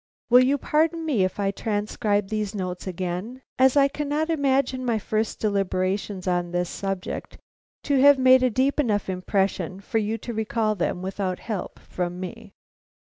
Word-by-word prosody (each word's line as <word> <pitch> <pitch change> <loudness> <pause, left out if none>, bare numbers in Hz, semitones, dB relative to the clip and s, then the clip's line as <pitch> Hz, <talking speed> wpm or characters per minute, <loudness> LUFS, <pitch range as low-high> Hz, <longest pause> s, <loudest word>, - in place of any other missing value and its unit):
Will 250 +1 +8
you 275 +3 +2
pardon 320 +3 +1
me 255 -11 +2
if 185 +2 -2
I 195 -1 +1
transcribe 205 -1 -1
these 215 -1 -2
notes 185 -1 -4
again, 185 +8 -4 0.2
as 265 +2 +5
I 280 0 +6
cannot 295 +3 -2
imagine 270 -3 +1
my 235 -3 +1
first 215 +1 -2
deliberations 195 -1 -1
on 175 -1 0
this 175 0 -1
subject 195 -2 -4 0.5
to 280 -3 +2
have 285 0 +7
made 260 0 +6
a 255 - +3
deep 265 +5 +1
enough 210 -8 +1
impression 185 -1 -1
for 215 +3 -1
you 215 +1 -1
to 235 - -6
recall 220 0 0
them 180 -1 -2
without 190 -1 -2
help 215 -5 -5
from 180 0 -5
me. 185 -1 -8
215 Hz, 165 wpm, -25 LUFS, 185-260 Hz, 0.5 s, Will